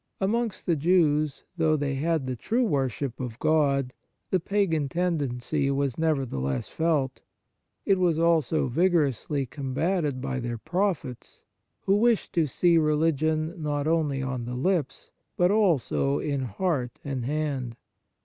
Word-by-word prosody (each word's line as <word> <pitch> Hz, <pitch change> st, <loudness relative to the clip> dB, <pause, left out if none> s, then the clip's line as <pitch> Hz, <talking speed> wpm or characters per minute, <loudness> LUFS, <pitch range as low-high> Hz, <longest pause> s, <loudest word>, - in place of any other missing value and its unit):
Amongst 225 Hz, +2 st, -1 dB
the 170 Hz, -, +2 dB
Jews, 155 Hz, -2 st, +2 dB
though 160 Hz, -2 st, +3 dB
they 145 Hz, -2 st, -1 dB
had 155 Hz, +1 st, 0 dB
the 130 Hz, -1 st, -3 dB
true 235 Hz, -, 0 dB
worship 135 Hz, -, -1 dB
of 120 Hz, -3 st, -5 dB
God, 140 Hz, -4 st, +1 dB, 0.4 s
the 185 Hz, -, +3 dB
pagan 165 Hz, -6 st, 0 dB
tendency 145 Hz, -4 st, -1 dB
was 140 Hz, -2 st, 0 dB
nevertheless 125 Hz, -, -1 dB
felt. 155 Hz, -5 st, 0 dB, 0.6 s
It 195 Hz, -2 st, +3 dB
was 175 Hz, -3 st, +2 dB
also 165 Hz, -2 st, +2 dB
vigorously 145 Hz, -, +1 dB
combated 140 Hz, +3 st, -1 dB
by 135 Hz, 0 st, -3 dB
their 120 Hz, -1 st, -3 dB
prophets, 175 Hz, -, -3 dB, 0.4 s
who 195 Hz, +1 st, +2 dB
wished 235 Hz, 0 st, +2 dB
to 165 Hz, -3 st, +2 dB
see 170 Hz, +4 st, +3 dB
religion 155 Hz, +1 st, +1 dB
not 145 Hz, -1 st, -1 dB
only 155 Hz, -4 st, +1 dB
on 130 Hz, -2 st, -3 dB
the 125 Hz, +1 st, -5 dB
lips, 160 Hz, +1 st, -1 dB, 0.3 s
but 175 Hz, +1 st, +4 dB
also 160 Hz, -, +2 dB
in 140 Hz, -3 st, -2 dB
heart 125 Hz, -, -2 dB
and 135 Hz, -3 st, -3 dB
hand. 140 Hz, -5 st, -2 dB
150 Hz, 135 wpm, -26 LUFS, 135-170 Hz, 0.6 s, but